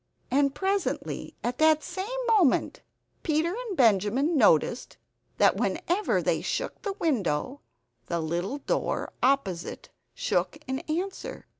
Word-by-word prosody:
And 275 +1 +2
presently 390 0 -2
at 245 +1 -2
the 315 0 +6
same 380 +6 -5 0.2
moment 405 - +3 0.4
Peter 320 +3 0
and 465 -5 -5
Benjamin 235 - +3
noticed 225 - +3 0.4
that - - +4
whenever 370 +5 0
they - - +1
shook - - -3
the 405 -4 -3
window 255 - -1 0.5
the 170 - -1
little 175 - -2
door 285 - -2
opposite 245 -10 0 0.3
shook - - 0
in 265 +1 -2
answer. 380 +9 -4
285 Hz, 120 wpm, -27 LUFS, 230-375 Hz, 0.5 s, the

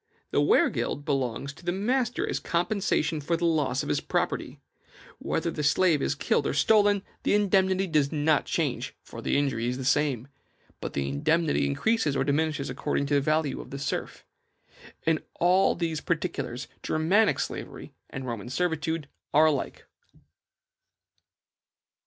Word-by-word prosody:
The - - +3
wehrgeld 145 - +2
belongs 135 -2 -1
to 160 - -17
the 175 - 0
master 240 +6 0
as - - -1
a - - -21
compensation 170 -3 0
for 165 +4 0
the 170 - -1
loss 150 -6 +1
of - - -5
his - - +1
property. - - -2 0.6
Whether 165 +1 -1
the 155 - -4
slave 150 +1 +3
is 145 - 0
killed 145 - +1
or - - -1
stolen, 205 +5 +4 0.2
the - - +2
indemnity 190 -2 +3
does 150 -5 +1
not 150 -1 +2
change, - - -2
for - - -9
the - - +1
injury 125 -5 0
is 125 +1 -1
the 130 - -5
same; 135 -3 +1 0.5
but - - -5
the 70 -1 -1
indemnity 150 - +1
increases 155 - +1
or 135 - +1
diminishes 150 +1 0
according 135 +2 -1
to 145 - -2
the 140 - +4
value 155 -1 0
of - - -12
the 140 - -6
serf. 140 - -4 0.8
In 160 -1 +3 0.2
all 180 +2 +4
these 165 -3 -2
particulars 160 -7 -3
Germanic 190 +8 +2
slavery - - -5 0.2
and 135 -1 -6
Roman 120 -2 -5
servitude 160 +1 -1 0.3
are 155 +1 +7
alike." 150 -3 -1
155 Hz, 155 wpm, -27 LUFS, 140-175 Hz, 0.8 s, are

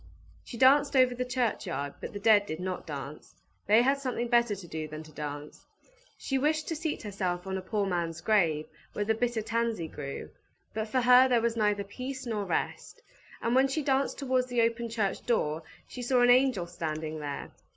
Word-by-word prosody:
She 240 - -9
danced 280 +3 +5
over 255 -1 +5
the 250 +1 -2
churchyard, 230 - -2
but - - -5
the 205 - -6
dead 205 -1 +5
did 155 - -4
not 185 0 -4
dance 145 0 -7 0.3
they 220 +3 +6
had 275 +2 +2
something 245 -3 -2
better 235 -3 +3
to 185 -3 -10
do 155 -1 -5
than 155 +1 -8
to 155 - -15
dance. 150 0 -7 0.5
She 270 -1 -1
wished 310 +2 +1
to 325 - -1
seat 315 0 -3
herself 185 -3 -3
on 190 0 -3
a 190 - -3
poor 205 +2 -1
man's 170 -3 -2
grave, 165 -8 +2 0.3
where 205 - -2
the 220 - +2
bitter 235 -1 -1
tansy 225 -6 -1
grew; 140 -3 -7 0.4
but 220 0 -2
for 255 +4 +1
her 250 +1 +7
there 245 -2 +4
was 230 0 0
neither 210 -2 +1
peace 260 +6 -6
nor 215 -4 -2
rest; - - -3 0.4
and 230 - +1
when 265 +2 +5
she 290 +3 -2
danced 275 0 +1
towards 255 -2 0
the 245 -2 +2
open 230 0 0
church 215 -4 -1
door, 160 -10 +1 0.3
she 250 - -8
saw 245 0 +2
an 245 0 +6
angel 250 -7 +3
standing 160 -2 -4
there. 145 -1 -5
220 Hz, 200 wpm, -29 LUFS, 175-250 Hz, 0.5 s, her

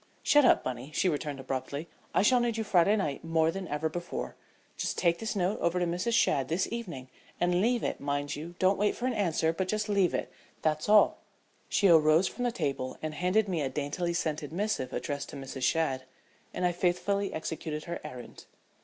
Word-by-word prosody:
"Shut 295 0 +5
up, - - +5
Bunny," 130 +1 -4
she - - +2
returned, 145 -4 -2
abruptly. 135 +4 -4 0.2
"I - - +3
shall 250 +4 +5
need 235 -2 0
you 225 - 0
Friday 200 0 +4
night 150 -9 -2
more 165 0 +2
than 190 0 -5
ever 150 +1 -1
before. 175 +2 -5 0.4
Just - - -2
take 170 -1 +2
this 220 -1 -3
note 190 +1 0
over 170 +1 +1
to 175 - +1
Mrs. 180 +7 -1
Shadd 135 -10 +3
this 170 +4 0
evening 175 - -5 0.3
and 175 +1 +2
leave 240 +2 +2
it - - -2
mind 145 0 -2
you, 165 +4 -8
don't 190 +1 +2
wait 210 0 +2
for 245 - -4
an 255 - +1
answer 165 -6 +1
but 185 +2 -2
just 215 +1 -1
leave 200 -3 +2
it, - - -3 0.3
that's 155 +3 0
all." 210 0 +5 0.5
She 200 - +3
arose 160 +1 +5
from 245 - -4
the 245 - +1
table 140 - -3
and 155 0 -3
handed 185 +6 +1
me 175 -5 -1
a 135 - -1
daintily 150 +6 -2
scented 155 -3 -2
missive 190 -8 -1
addressed 145 -1 -4
to - - -8
Mrs. 135 -1 -7
Shadd, 130 -2 +1 0.5
and 180 - -2
I 180 - +3
faithfully 185 +3 0
executed 155 -1 -4
her 170 0 -5
errand. 125 -1 -9
170 Hz, 205 wpm, -29 LUFS, 150-200 Hz, 0.5 s, Shut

